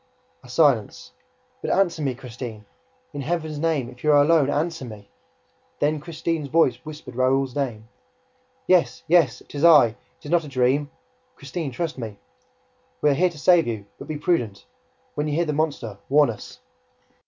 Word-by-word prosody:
A 125 - -16
silence. 125 -6 +1 0.5
"But - - -3
answer 175 -4 +2
me, 135 -4 -1
Christine!... 120 -4 -8 0.5
In 145 - -4
Heaven's 155 0 -3
name, 155 -6 0
if 125 0 -14
you 150 - +4
are 145 - +6
alone, 150 -2 +4
answer 160 +1 -1
me!" 105 -4 -10 0.7
Then 150 +1 +1
Christine's 160 -1 -3
voice 140 -5 +3
whispered 155 -4 -10
Raoul's 130 +1 +1
name. 120 -6 -3 0.8
"Yes! 180 -2 +2
Yes! 165 -7 +3
It - - -17
is 145 +1 -3
I! 150 -8 +8
It 110 - -14 0.3
is 145 - -7
not 175 -1 +3
a - - -9
dream!... 135 +2 +1 0.5
Christine, 140 +2 -5
trust 155 +2 -4
me!... 110 -4 -6 0.8
We 150 - +4
are - - +3
here 180 +6 +3
to 170 - -13
save 170 +1 +4
you... 110 -4 -4
but - - -9
be 155 -1 -4
prudent! 120 - -1 0.5
When 150 +1 -2
you 145 - -1
hear 170 +2 +1
the 150 - -1
monster, 140 -9 -2
warn 145 -2 +5
us!" 110 - -11
145 Hz, 175 wpm, -23 LUFS, 125-160 Hz, 0.8 s, I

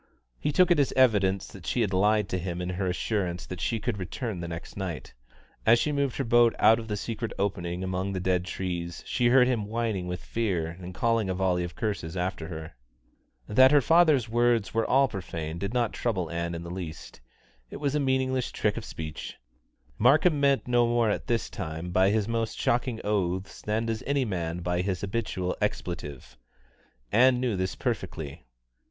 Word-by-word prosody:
He 150 - 0
took 180 +4 +4
it 170 - +5
as 140 - +2
evidence 100 -7 +3
that 90 -5 -11
she 125 - +1
had 100 -4 0
lied 105 +2 +3
to 90 - -1
him 90 -1 -4
in 90 0 -3
her 95 +1 -2
assurance 90 -1 -1
that 90 -1 -7
she 115 - 0
could 105 0 -2
return 100 +2 -4
the 85 - -4
next 85 0 -7
night. 90 -7 -5 0.5
As 115 +2 +6
she 150 - 0
moved 140 -3 0
her 135 - 0
boat 120 -1 +4
out 110 +2 +5
of 115 - -7
the 105 -1 -2
secret 115 +2 -4
openings 90 -3 -2
among 95 +1 -2
the 95 - -2
dead 90 -1 0
trees, 85 -3 -4
she 120 -2 +1
heard 125 +1 +6
him 115 -5 0
whining 110 -5 -2
with 90 0 -5
fear 100 -8 -1
and 90 +2 -9
calling 115 -1 +1
a 95 - -1
volley 90 -2 +1
of 85 0 -6
curses 95 -6 -3
after 90 -2 -2
her. 80 -1 -7 0.7
That 130 +5 +6
her 145 +1 +6
father's 155 -4 +4
words 120 -1 +2
were 115 0 +1
all 135 +1 +5
profane 85 -6 -5
did 100 +2 -3
not 120 -2 0
trouble 95 -9 -2
Ann 85 0 -2
in 85 - -6
the 85 - -7
least. 85 -8 -7 0.5
It - - -7
was 145 -1 -1
a 150 - +1
meaningless 130 -2 0
trick - - 0
of - - -5
speech. 80 -1 -7 0.6
Markham 150 +6 +4
meant 140 -2 +2
no 120 -1 +3
more 120 -2 +2
at - - -3
this 115 -2 0
time 80 -1 -5
by 95 +2 +4
his 105 0 +1
most 115 -1 -2
shocking 120 -1 0
oaths 95 -2 -1
than 110 +2 -1
does 115 -1 -2
any 140 -2 +1
man 85 -4 -3
by 90 0 0
his 95 -1 -2
habitual 95 -3 -2
expletive. 75 -7 -4 0.7
Ann 125 +2 +5
knew 125 -4 0
this 95 0 -2
perfectly. 70 -3 -4
100 Hz, 195 wpm, -27 LUFS, 90-120 Hz, 0.7 s, As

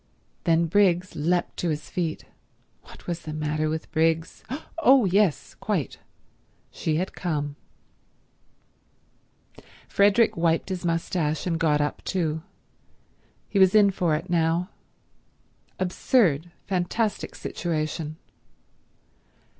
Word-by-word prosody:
Then 165 -1 +3
Briggs 185 0 +2
leapt 175 +4 0
to 175 - -1
his 150 -1 -3
feet. 165 -3 -2 0.6
What - - -15
was 175 -1 -3
the 155 -2 -7
matter 155 0 -1
with 160 +1 -4
Briggs? 165 +1 0 0.4
Oh—yes—quite: 210 - +2 0.7
she 155 - -1
had 185 +4 -2
come. 145 -5 -2 2.3
Frederick 205 +3 +4
wiped 165 +2 +1
his 185 -1 -3
moustache 165 -2 -1
and 165 -2 -1
got 150 -2 +3
up 145 - -2
too. 160 -4 -1 1.1
He 200 - 0
was 190 +1 +6
in 205 -2 +6
for 175 -4 +1
it 165 +4 -4
now. 170 +1 +1 1.1
Absurd, 180 - +2 0.2
fantastic 200 +4 -1
situation. 155 -2 -3
170 Hz, 100 wpm, -25 LUFS, 155-185 Hz, 2.3 s, was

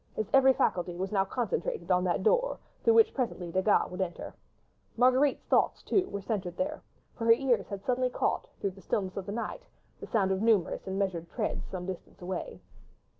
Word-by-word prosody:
His 215 - -1
every 265 -1 +7
faculty 175 -6 0
was 190 +2 -3
now 195 -2 +2
concentrated 245 - -2
on 180 0 +3
that 180 +1 0
door - - +2 0.3
through 460 - +5
which 450 -1 +5
presently 205 -10 -3
Desgas 190 +3 +2
would 180 +1 -4
enter. 175 -2 -4 0.6
Marguerite's 255 +3 +3
thoughts, - - +2
too, 375 -2 +1
were 200 -1 -5
centred 185 -5 -3
there, 290 +3 -2 0.3
for 230 - -4
her 230 - +6
ears 245 0 +1
had 200 -2 -6
suddenly 255 0 +1
caught, - - -1
through 200 - -1
the 195 +1 -15
stillness 190 -2 -2
of 195 -2 -5
the - - -3
night, 235 - -4 0.4
the - - -8
sound 195 -4 +1
of 190 0 0
numerous 215 -6 +2
and 190 0 -3
measured 180 -4 -2
treads 220 -4 -2
some 180 -2 -6
distance 185 -1 -7
away. 190 - -5
200 Hz, 195 wpm, -29 LUFS, 185-255 Hz, 0.6 s, every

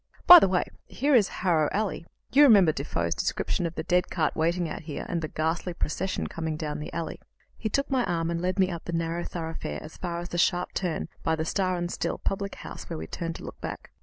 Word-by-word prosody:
By 355 0 +12
the - - +3
way, 185 -1 +2 0.2
here 285 +2 0
is 220 -6 +6
Harrow 165 -5 +1
Alley; 200 -4 -2 0.2
you 280 - +6
remember 205 - +7
Defoe's 85 - -2
description 175 - -1
of 165 - -8
the - - -3
dead 180 +1 +1
cart 160 -4 0
waiting 170 +2 +1
out - - -5
here, 155 -2 -6
and 170 -2 -2
the 155 - -2
ghastly 160 +3 -2
procession 180 +4 -2
coming 160 -2 -3
down 150 -1 -4
the 150 - -6
alley." 165 - -4 0.4
He 220 - -3
took 275 +6 0
my 260 -2 +2
arm 165 -1 -1
and 170 0 -2
led 185 +2 -1
me 190 -1 +3
up 170 -2 -6
the 175 - -4
narrow 165 +1 -1
thoroughfare 160 - -5
as 155 - -11
far 175 -2 -3
as 175 +1 -5
the 175 - -2
sharp 180 +1 +1
turn 180 -4 -2
by 160 - +1
the 160 0 -2
"Star 185 +1 0
and 175 0 -3
Still" - - -2
public 200 0 -3
house, - - -9
where - - -4
we 80 - -5
turned 165 - -4
to - - -9
look - - -9
back. - - -6
170 Hz, 240 wpm, -27 LUFS, 160-185 Hz, 0.4 s, By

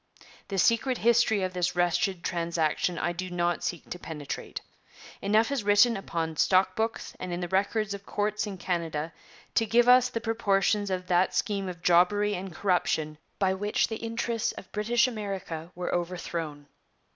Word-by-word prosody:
The 195 - -4
secret 230 +6 +3
history 230 -3 +3
of 185 0 -2
this 180 0 -1
wretched 175 +1 +1
transaction 170 0 0
I 175 - 0
do 185 +1 -5
not 175 -1 -1
seek 175 - -4
to 180 - -5
penetrate. 150 -5 -6 0.6
Enough 215 +6 +2
is 275 -6 -1
written 205 +4 +5
upon 165 -5 -3
stock 185 +2 +3
books 225 +1 -2
and 185 - -5
in 175 - -2
the 175 - -3
records 200 +3 0
of 200 0 -7
courts 210 +1 -1
in 195 -2 -6
Canada 165 -3 -3 0.4
to 225 - +3
give 240 +2 +4
us 250 0 +6
the 230 - -3
proportions 210 -2 +1
of 185 -1 -2
that 180 +1 +2
scheme 195 -2 -1
of 175 -2 -9
jobbery 205 +4 +4
and 190 0 -5
corruption 160 -4 0 0.2
by 190 -1 +2
which 205 +3 0
the 220 - -3
interests 230 0 -2
of - - -11
British 235 +4 +2
America 195 -7 -5
were 180 0 -3
overthrown. 170 -4 -3
190 Hz, 170 wpm, -28 LUFS, 175-215 Hz, 0.6 s, us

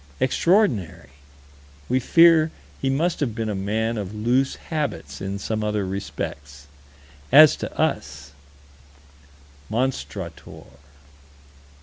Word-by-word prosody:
Extraordinary 115 - +1 0.8
we 130 - +1
fear 165 +3 +5 0.3
he 135 - 0
must 165 +6 0
have 120 -7 -2
been 115 -2 -3
a - - -1
man 110 +4 -2
of 100 +1 -6
loose 125 +5 +1
habits 80 - -5
in 95 +1 -4
some 110 +1 -3
other 105 -2 -1
respects. 75 -7 -6 0.7
As 150 +2 +8
to - - -5
us 75 -1 -2 1.4
Monstrator. 120 - -4
110 Hz, 100 wpm, -23 LUFS, 95-135 Hz, 1.4 s, As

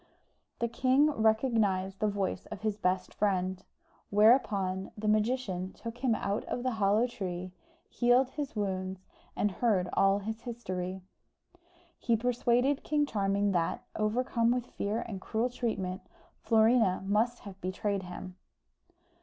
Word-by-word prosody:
The 235 - 0
king 260 +5 +3
recognised 220 -5 +1
the 215 - +2
voice 200 -2 -2
of 210 -3 -8
his 215 -2 0
best 185 -2 -1
friend: 190 -2 0 0.5
whereupon 200 -4 +3
the 215 +1 -3
magician 215 -4 0
took 230 +1 -8
him 245 -3 +2
out 200 0 -2
of 245 - -3
the 255 - +1
hollow 215 +1 +2
tree, 185 -6 -5 0.4
healed 245 +2 +3
his 285 -3 -5
wounds, 190 -2 -3 0.3
and 205 - +1
heard 190 -3 +1
all 195 0 +4
his 220 +2 -5
history. 185 -6 -5 1.0
He 230 -1 +2
persuaded 245 +3 +1
King 300 -1 +1
Charming 200 -3 +1
that, 170 -3 0
overcome 230 +2 +1
with 245 0 +1
fear 215 +3 -2
and 200 -6 -6
cruel 230 +5 -1
treatment, 195 -7 -2 0.4
Florina 225 -4 +3
must 220 +5 +1
have 195 -2 -11
betrayed 195 +2 -2
him. 180 0 -8
215 Hz, 135 wpm, -30 LUFS, 190-240 Hz, 1.0 s, all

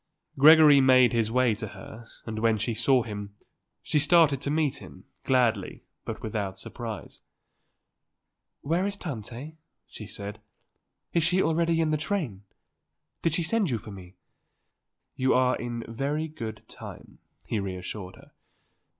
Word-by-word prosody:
Gregory 150 -1 +8
made 130 -2 +5
his 115 -2 +1
way 125 -1 +3
to 110 +1 -5
her 110 +4 -11 0.2
and 110 -1 -4
when 115 -1 +2
she 110 +3 -2
saw 120 +3 +3
him 105 -2 -7 0.5
she 155 - +1
started 155 -3 +4
to 140 - -2
meet 150 -2 0
him, - - -13 0.2
gladly, 120 -7 +1 0.2
but - - -6
without 100 -3 -3
surprise. 115 -4 -8 1.4
"Where 170 +6 0
is 200 - -3
Tante?" 140 - -7 0.3
she 110 - -10
said, 105 0 -7 0.7
"Is 170 - +2
she 180 +3 +3
already 165 0 +1
in 155 -1 +1
the 155 - +2
train? 150 - -3 0.8
Did 165 -2 +1
she 170 - 0
send 205 +2 +1
you 120 - 0
for 110 0 -10
me?" 95 -1 -12 1.0
"You 130 0 +2
are 125 0 +3
in 120 -1 -5
very 140 +7 -2
good 115 -8 -7
time," - - -11 0.3
he 110 - -2
reassured 95 0 -6
her. - - -18
125 Hz, 145 wpm, -27 LUFS, 110-155 Hz, 1.4 s, Gregory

